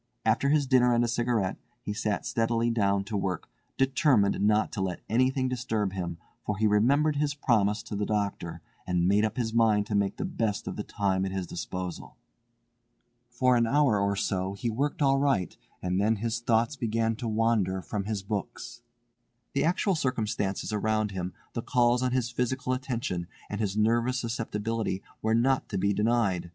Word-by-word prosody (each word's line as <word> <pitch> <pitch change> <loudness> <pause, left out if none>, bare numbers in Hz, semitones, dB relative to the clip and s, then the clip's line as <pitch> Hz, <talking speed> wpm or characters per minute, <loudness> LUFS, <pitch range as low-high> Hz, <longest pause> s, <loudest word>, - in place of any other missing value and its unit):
After 115 +5 +2
his 145 -1 +3
dinner 125 -2 +4
and 120 - +3
a - - +1
cigarette 115 -4 0 0.3
he 105 - -3
sat 105 -1 -2
steadily 115 0 +1
down 100 -3 +1
to 105 +2 -5
work, 95 -3 -2 0.3
determined 130 -7 +3
not 105 +1 +3
to 105 - -3
let 95 -2 -2
anything 130 +3 +2
disturb 115 -6 -1
him, 85 -3 -4 0.3
for 105 - -2
he 110 - +1
remembered 140 +9 +3
his 145 0 0
promise 105 -6 +1
to 115 -3 -6
the 105 0 -1
doctor, 100 -5 -2 0.2
and 90 -1 +1
made 100 +2 +3
up 110 +1 -1
his 115 -3 -1
mind 110 -3 +3
to 105 - -5
make 100 -1 +1
the 200 - -2
best 115 - -2
of - - -3
the - - -3
time 95 -4 0
at 95 - -2
his 95 -1 -3
disposal. 90 +1 -6 1.1
For 125 +1 +2
an 115 -1 +3
hour 135 -5 +3
or 100 0 +1
so 95 0 -1
he 120 +2 -2
worked 140 +6 -1
all 135 0 +4
right, 135 -10 +1 0.3
and 90 +1 0
then 110 +2 +3
his 115 +2 -2
thoughts 120 +3 +1
began 115 -2 0
to 120 - -4
wander 110 -4 +1
from 100 -2 -3
his 105 -2 -3
books. 105 +3 -5 0.7
The 140 - +1
actual 180 +4 +2
circumstances 110 - -1
around 110 0 0
him, 90 -1 -4 0.2
the 120 - -2
calls 120 +1 +2
on 130 0 +1
his 125 -2 0
physical 125 +2 -1
attention, 120 -9 -3 0.2
and 105 +1 -3
his 100 -1 -1
nervous 120 +4 +2
susceptibility 115 -3 -2 0.2
were 110 +1 +2
not 130 +3 +2
to - - -2
be 100 +2 +1
denied. 105 -5 +1
110 Hz, 185 wpm, -28 LUFS, 100-125 Hz, 1.1 s, dinner